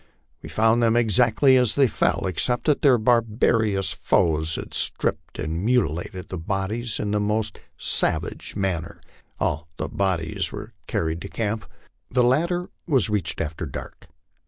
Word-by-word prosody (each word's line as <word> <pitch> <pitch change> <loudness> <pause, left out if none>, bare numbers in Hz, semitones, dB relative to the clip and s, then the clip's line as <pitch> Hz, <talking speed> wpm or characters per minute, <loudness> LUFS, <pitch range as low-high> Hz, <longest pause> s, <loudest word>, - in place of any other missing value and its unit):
We - - -9
found 110 +2 +2
them 115 -1 +3
exactly 120 +4 +4
as 125 -3 +2
they 140 - +5
fell, 105 - 0
except 95 +7 0
that 150 -2 +2
their 135 -4 +5
barbarous 110 -3 +1
foes 80 -1 +1
had - - -7
stripped - - +3
and 80 +3 -3
mutilated 95 - -1
the 95 - -5
bodies 105 +6 -2
in 105 - -2
the 105 - +1
most 105 +1 -1 0.2
savage - - -1
manner. 90 -4 -3 0.4
"All 80 +3 -1
the - - -4
bodies 90 -5 -1
were - - -8
carried 80 +1 -2
to 100 - -7
camp. 110 -1 -3 0.4
The 125 0 +2
latter 170 +8 +1 0.2
was 130 -9 +2
reached 105 -2 -1
after 80 +1 -4
dark. 65 - -9
105 Hz, 150 wpm, -24 LUFS, 90-120 Hz, 0.4 s, they